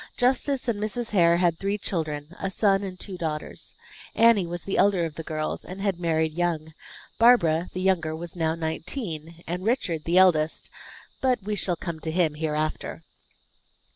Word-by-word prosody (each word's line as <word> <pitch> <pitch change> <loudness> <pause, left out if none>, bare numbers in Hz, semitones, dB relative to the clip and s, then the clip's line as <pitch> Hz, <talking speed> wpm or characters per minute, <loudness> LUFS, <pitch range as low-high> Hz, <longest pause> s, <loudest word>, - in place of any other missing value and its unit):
Justice 260 +1 +1
and 225 -4 0
Mrs. 225 +2 -2
Hare 170 -4 +5
had 170 -2 +2
three 200 +1 -1
children, 155 -4 -4
a 195 - -2
son 195 0 +2
and 185 -2 -6
two 190 -3 -6
daughters. 155 -2 -4 0.4
Anne 225 -6 +5
was 175 0 -3
the 195 - -1
elder 195 -4 +4
of 160 - -5
the 160 - -6
girls, 155 -1 -3
and 185 +2 -8
had 195 -3 -1
married 160 -2 +1
young; 160 -2 -1 0.5
Barbara, 180 -9 +5
the 185 - -3
younger 170 -5 +1
was 170 +2 -7
now 160 -2 0
nineteen, 165 - -4
and 180 +2 -4
Richard 190 - 0
the 170 +2 +2
eldest 165 -4 +3 0.5
but 250 -5 +1
we 210 +1 -2
shall 185 -3 0
come 170 -1 -5
to 160 - -4
him 160 -2 +2
hereafter. 155 0 -3
175 Hz, 170 wpm, -26 LUFS, 160-195 Hz, 0.5 s, Hare